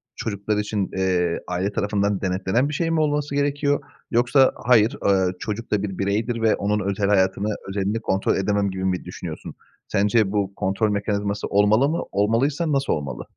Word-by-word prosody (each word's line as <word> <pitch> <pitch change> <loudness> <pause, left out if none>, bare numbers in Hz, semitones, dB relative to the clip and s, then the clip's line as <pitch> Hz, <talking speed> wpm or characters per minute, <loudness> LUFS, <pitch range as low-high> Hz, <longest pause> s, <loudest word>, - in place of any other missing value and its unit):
çocuklar 105 0 -2
için, 105 -2 -2
eee, 90 -2 +1
aile 90 +3 -1
tarafından 100 -1 0
denetlenen 95 +8 0
bir 150 - -5
şey 165 +3 0
mi 165 - +1
olması 145 -1 0
gerekiyor 145 0 +1 0.3
yoksa, 125 +3 +4
"Hayır, 120 +2 +4
ııı, 95 -2 +3
çocuk 110 +2 -5
da 105 -1 +1
bir 95 -3 -4
bireydir 110 +4 -1
ve 110 -1 +3
onun 105 +1 0
özel 100 0 -1
hayatını, 100 +1 +1
özelini 100 +3 -1
kontrol 95 -3 0
edemem." 100 +1 +1
gibi 95 0 -4
mi 90 -1 -1
düşünüyorsun? - - -7 0.3
Sence 105 0 +2
bu 100 -2 -1
kontrol 100 +3 0
mekanizması 100 0 -2
olmalı 105 +7 +3
mı? 165 - -1
Olmalıysa 135 +10 +1
nasıl 140 -1 +1
olmalı? 70 -4 -4
105 Hz, 165 wpm, -23 LUFS, 95-120 Hz, 0.3 s, yoksa